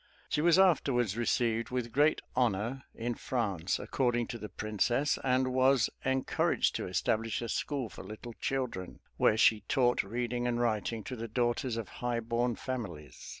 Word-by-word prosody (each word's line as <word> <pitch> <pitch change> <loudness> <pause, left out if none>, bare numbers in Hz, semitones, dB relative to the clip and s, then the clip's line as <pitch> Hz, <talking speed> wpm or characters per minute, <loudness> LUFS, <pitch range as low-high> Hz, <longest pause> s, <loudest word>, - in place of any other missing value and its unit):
She 150 - +1
was 170 +2 +5
afterwards 135 - +3
received 115 -1 0
with 125 -2 -2
great 145 +5 +3
honor 120 +2 0
in 120 +1 -2
France, 100 -9 -1
according 120 -3 0
to 120 - -5
the 105 - -7
princess, 120 +7 0
and 130 0 +2
was 130 -1 +4
encouraged 130 0 +1
to - - -4
establish 115 0 0
a - - -3
school 135 0 -2
for - - -10
little 110 +4 -8
children, 125 -9 -3 0.2
where 110 - +4
she 110 -2 +5
taught 125 -2 +3
reading 120 +3 -2
and 120 -1 0
writing 115 -1 0
to 130 - -5
the 115 -1 -5
daughters 120 +2 0
of 115 - -4
high 120 -1 0
born 120 +1 0
families. 85 - -6
120 Hz, 160 wpm, -31 LUFS, 110-130 Hz, 0.2 s, was